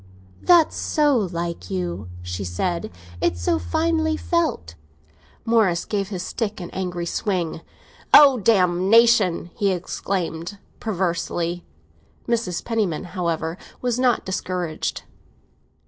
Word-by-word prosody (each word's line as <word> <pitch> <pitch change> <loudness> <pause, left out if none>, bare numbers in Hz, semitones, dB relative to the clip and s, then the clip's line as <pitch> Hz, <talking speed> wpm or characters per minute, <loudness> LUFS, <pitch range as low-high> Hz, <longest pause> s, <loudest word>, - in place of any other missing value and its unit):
"That's 345 -3 +5
so 295 -3 +2
like 170 - -2
you," 90 0 -3
she 90 +2 -4
said; 170 - -2 0.3
"it's 85 - +1
so 85 -1 +1
finely 315 - 0
felt." 325 - -1 0.7
Morris 215 -7 +2
gave 200 -2 -2
his 185 -3 -4
stick 215 +1 -3
an 175 - -7
angry 180 -2 -3
swing. 170 -3 -2 0.5
"Oh, 275 -4 +8
botheration!" 190 -1 +4
he 200 - +1
exclaimed 180 0 -3 0.2
perversely. 175 -3 -2 0.6
Mrs. 230 -7 -1
Penniman, 215 -9 -1
however, 170 -1 -2 0.2
was 245 -1 -1
not 250 -2 +2
discouraged. 180 -4 -3
185 Hz, 105 wpm, -23 LUFS, 170-225 Hz, 0.7 s, Oh